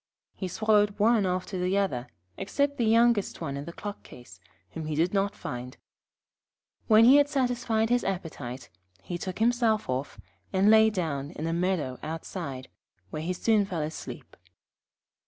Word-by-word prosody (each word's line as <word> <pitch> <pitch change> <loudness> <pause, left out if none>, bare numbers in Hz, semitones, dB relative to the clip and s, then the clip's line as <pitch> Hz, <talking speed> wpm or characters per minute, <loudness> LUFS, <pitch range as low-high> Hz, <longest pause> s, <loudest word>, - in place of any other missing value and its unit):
He 190 - -5
swallowed 210 +1 +2
one 215 -1 +3
after 185 +1 -2
the 180 +2 +1
other, 135 -12 -1 0.3
except 280 +8 -1
the 235 - +2
youngest 230 -1 +3
one 140 -5 -4
in 140 +1 -5
the 170 - -7
clock 205 +3 -7
case, 95 -8 -14 0.3
whom 160 +4 -6
he 155 - -2
did 170 +5 +1
not 200 0 0
find. 125 +2 -7 1.1
When 220 0 +7
he 265 +4 +8
had 285 0 +4
satisfied 240 -5 0
his 245 0 +3
appetite, 135 - -5 0.3
he 175 - -5
took 185 0 -5
himself 225 -1 +2
off, 130 +3 -3 0.3
and 195 +2 +4
lay 220 0 +7
down 155 -9 -3
in 155 - -6
a 165 - -1
meadow 170 -7 -1
outside, 155 -4 -6 0.4
where 155 - -4
he 170 +3 -2
soon 215 +3 +2
fell 180 -6 -3
asleep. 155 +1 -7
190 Hz, 160 wpm, -27 LUFS, 155-220 Hz, 1.1 s, he